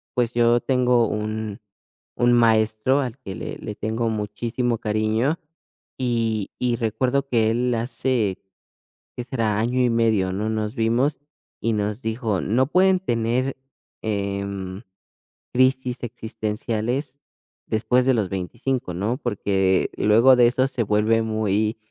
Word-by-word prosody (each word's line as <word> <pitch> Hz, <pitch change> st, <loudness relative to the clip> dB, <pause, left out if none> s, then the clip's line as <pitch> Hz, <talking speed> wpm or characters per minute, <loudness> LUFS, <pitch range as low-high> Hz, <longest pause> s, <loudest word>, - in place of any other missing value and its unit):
pues, 120 Hz, -1 st, +1 dB
yo 120 Hz, 0 st, +4 dB
tengo 125 Hz, -3 st, +2 dB
un 110 Hz, 0 st, -3 dB, 0.6 s
un 120 Hz, 0 st, +3 dB
maestro 115 Hz, +2 st, +3 dB
al 125 Hz, -2 st, -4 dB
que 95 Hz, -7 st, -7 dB
le -, -, -6 dB
le 105 Hz, -, -6 dB
tengo 115 Hz, +2 st, -1 dB
muchísimo 115 Hz, +3 st, -2 dB
cariño 110 Hz, +8 st, 0 dB, 0.6 s
y 115 Hz, -5 st, -1 dB
y 125 Hz, -1 st, +1 dB
recuerdo 125 Hz, +4 st, 0 dB
que 110 Hz, -3 st, +2 dB
él 125 Hz, +2 st, 0 dB
hace, 115 Hz, -3 st, -1 dB, 0.8 s
¿qué 125 Hz, -, -3 dB
será?, 115 Hz, -4 st, -1 dB
año 125 Hz, +3 st, +1 dB
y 125 Hz, -, +3 dB
medio, 110 Hz, -5 st, +2 dB
¿no?, 105 Hz, +3 st, -2 dB
nos 110 Hz, +1 st, -2 dB
vimos 120 Hz, +5 st, +1 dB, 0.4 s
y 115 Hz, -, +1 dB
nos 105 Hz, +2 st, -2 dB
dijo: 110 Hz, -4 st, -1 dB
"No 125 Hz, +5 st, +1 dB
pueden 185 Hz, +4 st, +4 dB
tener, 125 Hz, -3 st, -1 dB, 0.4 s
em, 100 Hz, -1 st, -3 dB, 0.7 s
crisis 130 Hz, -1 st, +1 dB
existenciales 115 Hz, +3 st, -3 dB, 0.5 s
después 125 Hz, +3 st, +1 dB
de 130 Hz, -, +4 dB
los 110 Hz, -5 st, +1 dB
25, 95 Hz, +3 st, -3 dB
¿no? 105 Hz, +7 st, -1 dB
Porque 95 Hz, -7 st, +1 dB
luego 115 Hz, +5 st, +6 dB
de 120 Hz, -1 st, +6 dB
eso 130 Hz, +2 st, +2 dB
se 130 Hz, -3 st, -2 dB
vuelve 110 Hz, +2 st, +2 dB
muy 110 Hz, -1 st, 0 dB
115 Hz, 130 wpm, -23 LUFS, 105-125 Hz, 0.8 s, luego